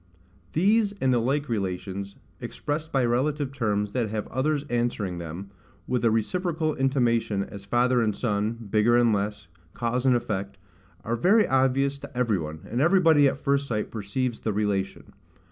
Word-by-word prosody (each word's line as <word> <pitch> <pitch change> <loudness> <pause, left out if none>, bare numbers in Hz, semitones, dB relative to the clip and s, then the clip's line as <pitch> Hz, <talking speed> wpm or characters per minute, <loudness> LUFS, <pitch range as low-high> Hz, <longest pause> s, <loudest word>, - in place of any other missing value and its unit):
These 205 +5 +3
and 130 -1 +2
the 120 - +3
like 140 +5 0
relations, 100 -2 -3 0.2
expressed 155 +2 -4
by 135 -3 +2
relative 135 +3 0
terms 105 -5 -1
that 120 -3 -1
have 105 0 -3
others 145 +2 0
answering 120 -8 -1
them, 85 +4 -7 0.3
with 125 -2 -1
a 115 - +5
reciprocal 160 - 0
intimation, 120 -7 +1
as 100 0 -10
father 120 +3 +2
and 110 -3 0
son, 105 -1 -1 0.2
bigger 110 +2 +4
and 120 -2 +4
less, 100 -3 -2 0.3
cause 125 +2 -1
and 125 - +5
effect, 100 -4 -3 0.5
are 115 - -1
very 200 - +4
obvious 135 +1 +2
to 140 -2 -10
every 115 -6 +1
one, 80 0 -6
and 120 +4 -1
everybody 165 -3 +5
at 135 - -1
first 140 0 0
sight 105 -4 -2
perceives 115 +3 -3
the 110 - -2
relation. 100 -2 -2
120 Hz, 160 wpm, -26 LUFS, 105-140 Hz, 0.5 s, a